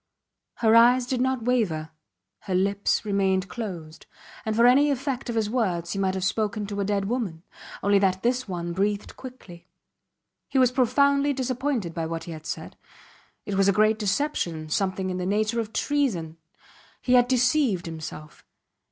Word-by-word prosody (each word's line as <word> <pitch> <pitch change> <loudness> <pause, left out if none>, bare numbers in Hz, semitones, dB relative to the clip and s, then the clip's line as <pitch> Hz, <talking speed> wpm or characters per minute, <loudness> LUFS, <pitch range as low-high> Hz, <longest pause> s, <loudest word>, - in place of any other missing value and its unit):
Her 225 -1 +3
eyes 240 +2 +6
did 250 0 -1
not 260 -2 0
waver, 180 -11 0 0.5
her 185 - -3
lips 200 +4 +1
remained 195 -2 +1
closed; 175 -8 -7 0.4
and 220 -1 -1
for 235 +1 +4
any 275 +4 +5
effect 270 -2 -2
of 235 - -2
his 220 -2 +1
words 185 -8 -1
he 200 - -3
might 190 -1 0
have 190 - -3
spoken 210 +2 -1
to 200 0 -5
a - - +1
dead 200 0 -1
woman, 200 -8 -3 0.4
only 200 0 +4
that 190 -1 +1
this 250 +1 0
one 175 -2 -4
breathed 200 +3 -1
quickly. 190 -10 -12 0.8
He 275 - -1
was 255 -2 +5
profoundly 280 +3 +3
disappointed 255 - -2
by 165 -1 -3
what 165 0 -4
he 170 - -8
had 155 -1 -8
said. - - -6 0.7
It 205 - -4
was 195 0 +3
a - - +6
great 215 +2 +3
deception, 185 - -1
something 190 +2 -1
in 180 - -3
the 180 - -3
nature 215 +3 0
of 220 -2 -3
treason. 220 - -1 0.6
He 250 - 0
had 245 -1 +5
deceived 250 - +2
himself. 155 -2 -8
210 Hz, 170 wpm, -25 LUFS, 185-250 Hz, 0.8 s, eyes